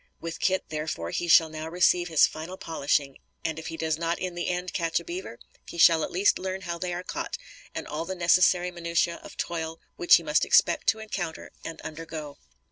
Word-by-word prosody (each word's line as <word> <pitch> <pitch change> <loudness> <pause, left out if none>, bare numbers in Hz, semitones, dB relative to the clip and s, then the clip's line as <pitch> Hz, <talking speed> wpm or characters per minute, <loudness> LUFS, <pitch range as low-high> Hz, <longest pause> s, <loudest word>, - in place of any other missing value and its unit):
With 165 0 -6
Kit 190 0 +1
therefore 150 - -3
he 175 - -2
shall 165 0 +7
now 155 +1 -6
receive 175 0 +3
his 160 -3 +5
final 165 +4 -6
polishing, 140 -4 -1 0.3
and 160 -1 -2
if 160 - -7
he 165 - -5
does 160 -1 -1
not 170 0 0
in 185 -1 -4
the 175 0 -3
end 180 0 -3
catch 165 -1 0
a - - -10
beaver, 360 +3 -6 0.3
he - - -8
shall 165 -1 +6
at - - -2
least 190 +3 +2
learn 190 0 -4
how 170 -2 -4
they 180 +1 -3
are 175 +1 -4
caught, - - -4 0.4
and - - -4
all 155 +3 -4
the 190 - -4
necessary 180 +1 +4
minutiæ 170 0 -1
of - - -12
toil 165 -1 -3 0.2
which 175 - +7
he 170 - +1
must 150 0 +2
expect - - +3
to 220 - +4
encounter 195 -7 -5
and 165 - -7
undergo. 155 -2 -7
170 Hz, 210 wpm, -27 LUFS, 160-180 Hz, 0.4 s, shall